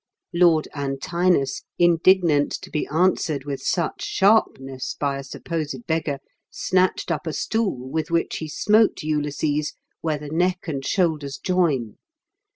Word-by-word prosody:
Lord 170 -3 +4
Antinous, 140 +1 0 0.2
indignant 170 -3 +4
to - - -10
be 150 - -1
answered 160 -3 +1
with 140 -2 -4
such 170 +3 -1
sharpness 135 - +1
by 140 -1 -1
a - - -6
supposed 160 - -5
beggar, 160 -5 -1 0.3
snatched 185 -1 0
up 165 +1 -2
a 160 - -2
stool, 195 - -1
with 160 +4 -2
which 170 0 0
he 160 - -5
smote 215 +6 +2
Ulysses 150 0 -1 0.3
where 155 -2 -1
the 150 0 -8
neck 180 +3 0
and 140 -4 -3
shoulders 150 -6 0
join. 150 - 0
155 Hz, 135 wpm, -23 LUFS, 145-180 Hz, 0.3 s, Lord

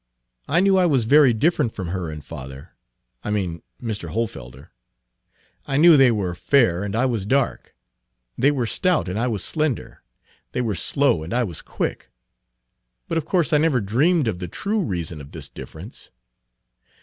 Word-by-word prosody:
I 165 +4 +3
knew 195 0 +4
I 180 - +4
was 135 -7 +2
very 140 +3 +6
different 145 +1 +1
from 95 -4 -5
her 90 -2 -3
and 75 -2 -8
father, 70 -1 -9 0.5
I - - -4
mean 95 -5 -2 0.2
Mr. 110 -9 -4
Hohlfelder. 70 - -5 1.0
I 135 - 0
knew 165 +2 +8
they 135 -3 +6
were 100 -5 -1
fair 100 -2 +2
and 100 0 -3
I 120 +3 +2
was 115 -6 -1
dark; 135 +1 -1 0.6
they 135 - +3
were 135 -5 0
stout 175 - +1
and 95 +4 -3
I 120 - +1
was 105 -6 -2
slender; 155 -6 -2 0.5
they 125 - 0
were 115 -4 -1
slow 130 - +1
and 85 +8 -4
I 125 - +2
was 90 -9 -4
quick. - - -4 1.0
But 165 - 0
of 155 - -7
course 170 -4 +1
I 150 - +5
never 150 -5 +2
dreamed 135 - +2
of 90 -5 -2
the 90 - -5
true 205 - -2
reason 85 - -3
of 70 - -13
this - - -6
difference. - - -10
115 Hz, 175 wpm, -22 LUFS, 90-145 Hz, 1.0 s, knew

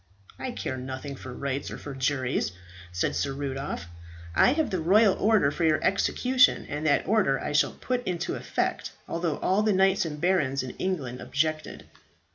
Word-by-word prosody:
"I 260 - -3
care 130 - -4
nothing 130 +2 -6
for 130 -1 -9
rights 140 +2 -3
or - - -6
for 145 - -8
juries," 130 -6 -1 0.4
said 90 +1 -1
Sir 140 - -1
Rudolph. 135 -7 -4 0.5
"I 250 - +5
have 315 0 0
the 185 - 0
royal 200 +4 +5
order 210 -10 +3
for 170 - -3
your 155 -1 +3
execution, 250 +6 +3
and 150 +2 -3
that 145 - +2
order 195 -12 +2
I - - -3
shall 145 - +2
put 250 -1 -3
into 175 -1 -2
effect, - - -2
although 165 -3 -2
all 190 +3 +1
the 215 -1 +2
knights 190 +1 +3
and 150 -3 -5
barons 145 -7 +1
in 130 - -5
England 140 -10 -3
objected." 155 +2 -2
155 Hz, 175 wpm, -27 LUFS, 135-190 Hz, 0.5 s, I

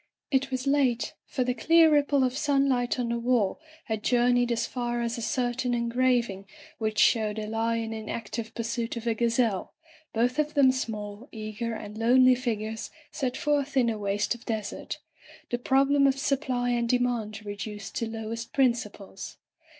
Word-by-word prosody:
It 270 0 +2
was 260 0 -3
late, 275 -4 +1
for 255 - -1
the 250 0 0
clear 325 +6 +5
ripple 285 -2 +3
of 255 0 0
sunlight 275 -4 +1
on 245 -2 -1
the 235 0 -1
wall 235 -2 +1 0.2
had 220 -4 -3
journeyed 245 +1 +3
as 235 - 0
far 240 -1 -2
as 235 -1 -1
a 235 - -5
certain 245 +1 0
engraving 235 -4 +1 0.3
which 215 -1 -2
showed 215 -2 +3
a 215 - -3
lion 225 +1 -1
in 220 -1 -6
ac 225 -3 -4
tive 225 -1 -5
pursuit 235 0 -3
of 235 - -6
a 230 - +2
gazelle, 230 -3 0 0.4
both 245 +5 +1
of 300 0 0
them 275 -2 +6
small, 215 -2 -5
eager, 220 +1 -4
and 210 0 -8
lonely 255 +2 +6
figures 225 -3 -3 0.2
set 260 -3 -2
forth 290 -2 0
in 240 -3 +4
a 215 - -4
waste 200 +2 0
of 240 -1 -11
desert 215 -3 -4 0.3
— - - -21
the 240 - 0
problem 275 +2 +4
of 270 0 +2
supply 260 -3 0
and 235 -1 0
de 250 - +4
mand 225 -4 -2
reduced 205 -1 -6
to 230 - -2
lowest 225 +1 -5
principles. 235 -7 -1
240 Hz, 175 wpm, -27 LUFS, 220-255 Hz, 0.4 s, them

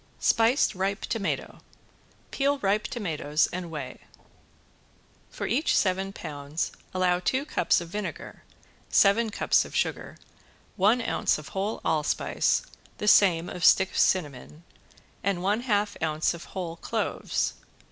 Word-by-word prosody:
~SPICED 230 +5 +3
RIPE 195 +2 -2
TOMATO~ 220 -4 -3 0.7
Peel 280 +1 +1
ripe 205 -2 0
tomatoes 155 -8 -1
and 175 -1 -4
weigh. 150 -5 -7 1.3
For - - -5
each 275 +9 +1
seven 190 0 +1
pounds 145 -2 -4 0.2
allow 180 -1 +1
two 260 +10 0
cups 180 - +2
of 170 - -8
vinegar, 210 +3 -6 0.5
seven 220 +3 +4
cups 210 - +2
of - - -10
sugar, - - -2 0.6
one 215 +6 +3
ounce - - +1
of 155 -2 -10
whole 195 +3 -3
allspice, 155 - +1 0.3
the 210 - -4
same 175 -5 +5
of 180 - -6
stick 190 -1 +5
cinnamon 150 -2 0 0.6
and 190 -2 -1
one 205 +3 +1
half 210 -4 0
ounce 155 0 0
of 170 - -9
whole 170 -3 -6
cloves. - - -2
190 Hz, 125 wpm, -27 LUFS, 165-210 Hz, 1.3 s, same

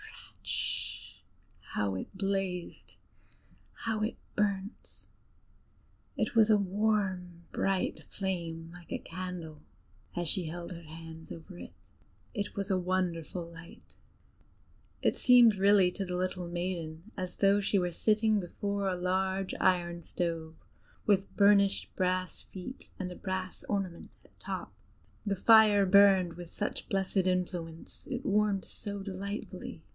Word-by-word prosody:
"Rischt!" - - -3 0.6
how 100 -2 +1
it 95 - -5
blazed, 195 -2 -2 0.9
how 220 -1 0
it 215 - -1 0.2
burnt! 200 0 -2 1.1
It - - -1
was 225 -1 +6
a 215 - +7
warm, 190 -3 0
bright 195 -1 0
flame, 170 -4 -3
like 175 -1 -13
a - - 0
candle, 170 -3 -6 0.5
as 175 -1 -1
she 180 +3 +1
held 170 +2 -6
her 170 -1 -7
hands 160 0 -10
over 175 +2 -9
it: - - -9 0.6
it 205 -3 -3
was 200 0 -3
a 185 - +3
wonderful 180 -2 -1
light. 165 0 -13 1.1
It - - +3
seemed 245 -4 +7
really 195 -1 +5
to 195 - -3
the 180 -1 -3
little 180 -1 -2
maiden 175 +1 -4
as 185 -1 -5
though 200 0 +4
she 200 +1 +2
were 180 -1 0
sitting 215 +3 +3
before 200 +2 -2
a 180 - -1
large 190 +1 0
iron 175 -1 +2
stove, 165 -1 -3 0.5
with 195 -2 +2
burnished 200 -1 +4
brass 185 -1 0
feet 195 +8 -9
and 185 -1 -2
a - - -7
brass 185 -1 -4
ornament 195 -4 -2 0.2
at - - -24
top. - - -5 0.5
The 200 -1 +1
fire 215 -1 +7
burned 190 -2 +6
with 175 0 -9
such 205 - -4
blessed 195 0 0
influence; 180 -3 -1
it 260 -1 -3
warmed 205 -1 +2
so 200 -2 -5
delightfully. 200 +2 -6
185 Hz, 130 wpm, -31 LUFS, 175-200 Hz, 1.1 s, a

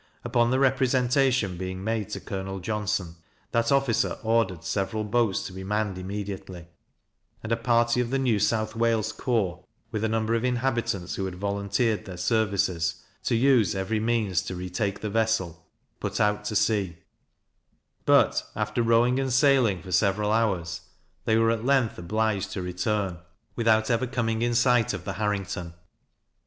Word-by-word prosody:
Upon 120 0 +2
the 130 - +2
representation 130 -5 +2
being 95 0 -5
made 110 -1 -2
to - - -4
Colonel 95 0 -5
Johnston, 100 -4 -2 0.3
that 115 +1 +1
officer 135 -4 +2
ordered 110 -6 +1
several 100 +5 -1
boats 105 -2 +1
to 95 - -7
be 95 +1 -7
manned 105 -1 -1
immediately, 95 -2 -6 0.8
and 115 - -5
a - - +4
party 120 +1 +2
of 120 - -2
the 135 - 0
New 125 -6 +1
South 110 +1 0
Wales 115 -1 +1
corps, 100 -7 -1 0.3
with 110 -2 -2
a 110 - +1
number 110 0 0
of 115 0 0
inhabitants 120 -7 -1
who 95 - -1
had 95 -1 -5
volunteered 100 +3 -1
their 95 -2 -8
services, 90 -4 0 0.2
to 120 - +2
use 120 -6 +3
every 95 +3 -1
means 110 -5 +1
to 95 0 -6
re 90 0 -6
take 100 +1 -2
the 105 - -3
vessel, 100 -7 -1 0.3
put - - -3
out 105 0 +1
to 105 - -3
sea; 100 -5 +1 1.1
but, - - +4
after 105 +2 -1
rowing 115 +2 +3
and 135 -1 -1
sailing 125 - +3
for 95 - -9
several 100 +3 +2
hours, 95 -7 0 0.4
they 110 - +3
were 115 0 +4
at 115 -1 -2
length 130 -6 +2
obliged 100 +2 -1
to 95 - -3
return, 90 0 -2 0.4
without 110 0 +2
ever 115 +2 +1
coming 115 -3 -1
in 120 0 +1
sight 120 -3 +3
of 90 -2 -8
the - - -3
Harrington. 95 -5 -3
110 Hz, 165 wpm, -26 LUFS, 95-115 Hz, 1.1 s, a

